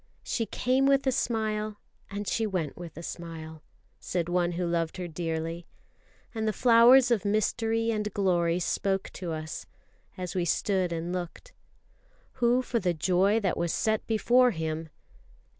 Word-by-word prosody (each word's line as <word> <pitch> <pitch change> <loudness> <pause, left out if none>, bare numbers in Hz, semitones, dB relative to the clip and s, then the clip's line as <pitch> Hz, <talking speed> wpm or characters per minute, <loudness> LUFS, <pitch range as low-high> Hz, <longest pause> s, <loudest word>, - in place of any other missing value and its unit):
"She 225 -3 -2
came 260 +2 +1
with 275 0 +3
a 265 - +3
smile, 215 -3 -1 0.3
and 200 +1 -5
she 225 -1 0
went 175 -8 -2
with 170 -2 -9
a 170 - -7
smile," 160 -2 -7 0.4
said 175 -1 -2
one 175 0 +1
who 175 +1 -2
loved 170 -1 -1
her 180 -1 -4
dearly; 165 0 -4 0.7
and 220 -1 -2
the 215 - +1
flowers 245 +2 +6
of 215 -6 +2
mystery 225 +2 +1
and 210 -1 -2
glory 175 -3 +1
spoke 195 +2 -1
to 180 -3 -5
us, 155 0 -5 0.5
as 180 -2 -4
we 180 - 0
stood 185 +1 0
and 170 +1 -3
looked. 185 - -6 0.9
"Who 245 +2 +3
for 240 -2 -1
the 180 -4 0
joy 185 +6 +2
that 190 - 0
was 170 -1 0
set 220 +4 0
before 245 +3 +4
Him 160 -4 -3
190 Hz, 160 wpm, -28 LUFS, 170-225 Hz, 0.9 s, flowers